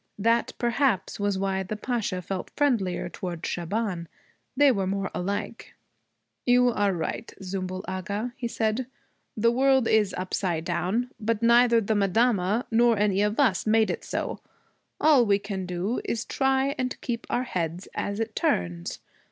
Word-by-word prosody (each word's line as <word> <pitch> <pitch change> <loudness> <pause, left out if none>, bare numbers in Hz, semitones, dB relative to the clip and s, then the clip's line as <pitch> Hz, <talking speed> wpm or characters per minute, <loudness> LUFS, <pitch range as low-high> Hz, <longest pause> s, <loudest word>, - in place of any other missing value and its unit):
That 230 +3 +2
perhaps 240 -6 0
was 205 -1 0
why 190 0 0
the 190 +3 -4
Pasha 210 -5 -2
felt 190 +1 -4
friendlier 220 -14 +1
toward 175 -1 -6
Shaban. 180 0 -2 0.5
They 285 -1 +6
were 195 -5 0
more 195 0 -2
alike. 200 +3 -4 0.7
'You 245 0 +4
are 205 -4 +1
right, 175 +5 -4
Zümbül 185 0 -4
Agha,' 200 +6 -3
he 255 -3 -3
said, 225 +2 -1 0.5
'the 230 +2 +4
world 265 0 +3
is 210 -3 +2
upside 180 -3 -2
down. 195 +8 -1
But 225 +1 -1
neither 235 0 +6
the 220 0 0
madama 210 +2 +2
nor 235 0 +4
any 200 -1 +2
of 210 +4 0
us 225 -8 +2
made 220 0 +4
it - - -5
so. - - -3 0.6
All 295 -5 +6
we 205 -3 +3
can 200 -2 -5
do 180 +6 -2
is 230 -1 -2
try 270 +1 +1
and 255 0 -2
keep 240 -1 -4
our 245 - 0
heads 175 -5 -3
as 200 +1 -3
it 225 -1 -3
turns. 85 -1 -1
210 Hz, 155 wpm, -26 LUFS, 185-240 Hz, 0.7 s, They